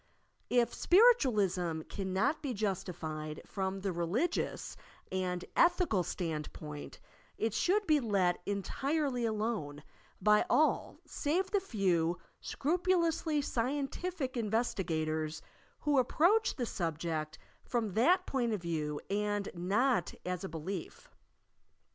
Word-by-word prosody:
If 240 -1 +3
Spiritualism 210 - +4
cannot 195 - -1
be 265 -5 -3
jus 200 -3 -1
tified 155 -3 -6
from 190 -1 -3
the 195 0 -1
religious 195 - -1 0.4
and 180 -1 -2
ethical 340 - +4
standpoint, 150 -3 -5 0.4
it 225 -1 0
should 390 - +2
be 305 -4 +4
let 195 -8 +1
entirely 265 +6 -1
alone 210 -10 -2 0.4
by 210 0 +5
all 310 -2 +2
save 360 +6 -1
the 410 - +3
few 185 - +1 0.2
scrupulously 335 -2 +1
scientific 275 +4 -2
investigators 160 -9 -1 0.4
who 290 -2 +3
approach 355 - +3
the 245 - -2
subject 160 -4 -3 0.3
from 225 -6 -1
that 330 - +4
point 240 -4 0
of 200 -5 -3
view 150 -3 -2
and 205 0 -1
not 210 +9 +1
as 180 0 -3
a 190 - -4
belief. 165 +3 -6
210 Hz, 110 wpm, -33 LUFS, 175-280 Hz, 0.4 s, by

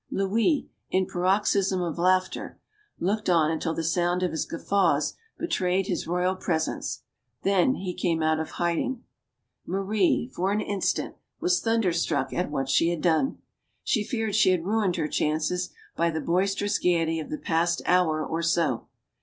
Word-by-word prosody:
Louis, 225 - +1 0.2
in 185 0 +2
paroxysms 190 +1 +1
of 170 -1 -3
laughter, 185 +1 +1 0.4
looked 205 +3 -1
on 160 -3 +4
until 160 0 -2
the 165 - -2
sound 175 +2 +1
of 180 - 0
his 160 - -2
guffaws 165 -5 +1 0.2
betrayed 190 - 0
his - - -2
royal 180 +2 +1
presence. 165 -4 -2 0.4
Then 195 +6 +3
he 185 -2 -4
came 165 -3 0
out 155 0 +2
of 160 - -3
hiding. 175 +9 -1 0.6
Marie, 195 +3 +1
for 185 +3 0
an 210 - +1
instant, 205 -2 -1 0.2
was 360 0 +2
thunder 225 -6 +1
struck 170 - 0
at 180 - -1
what 135 -2 -2
she 165 +5 +3
had 170 -2 -2
done. 175 +10 +1 0.4
She 215 - +1
feared 220 -2 -2
she 215 -2 +5
had 180 -3 +1
ruined 205 -3 +1
her 160 -3 -1
chances 155 +4 0 0.3
by 170 - +2
the 160 -1 -2
boisterous 195 +4 0
gayety 165 -2 +1
of 155 - -6
the 155 - -3
past 170 +2 0
hour 160 -4 +2
or 165 +1 -2
so. 165 -7 +1
180 Hz, 160 wpm, -26 LUFS, 165-195 Hz, 0.6 s, she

